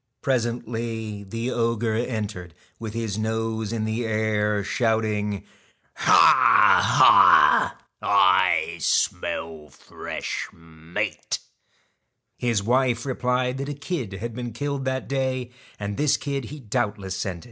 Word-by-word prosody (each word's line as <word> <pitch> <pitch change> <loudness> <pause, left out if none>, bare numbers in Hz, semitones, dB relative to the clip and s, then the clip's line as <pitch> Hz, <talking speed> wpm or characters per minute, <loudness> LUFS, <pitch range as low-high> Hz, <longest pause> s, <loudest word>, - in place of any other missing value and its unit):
Presently 115 -4 -3
the 115 +5 -4
ogre 115 -1 0
entered, 105 -7 -4 0.2
with 110 -1 -7
his 110 -3 -3
nose 110 0 -2
in 110 -2 -2
the 110 +2 -2
air, 105 -2 0
shouting: 105 -2 -1 0.2
' - - -38
Ha! - - +4 0.7
Ha! - - +6 0.2
I - - +3
smell 80 -2 -1
fresh - - -6
meat.' 80 0 -5 1.0
His 115 -5 -1
wife 120 +1 +1
replied 125 0 -1
that 140 +1 -4
a 145 - -4
kid 140 - -5
had 115 +4 -6
been 120 -1 -6
killed 140 +2 -3
that 130 0 -2
day, 130 -2 -2 0.3
and 100 -1 -4
this 150 -1 +2
kid 140 -3 -4
he 150 +6 -9
doubtless 100 -4 -3
scented. 95 -2 -4
115 Hz, 120 wpm, -24 LUFS, 105-125 Hz, 1.0 s, Ha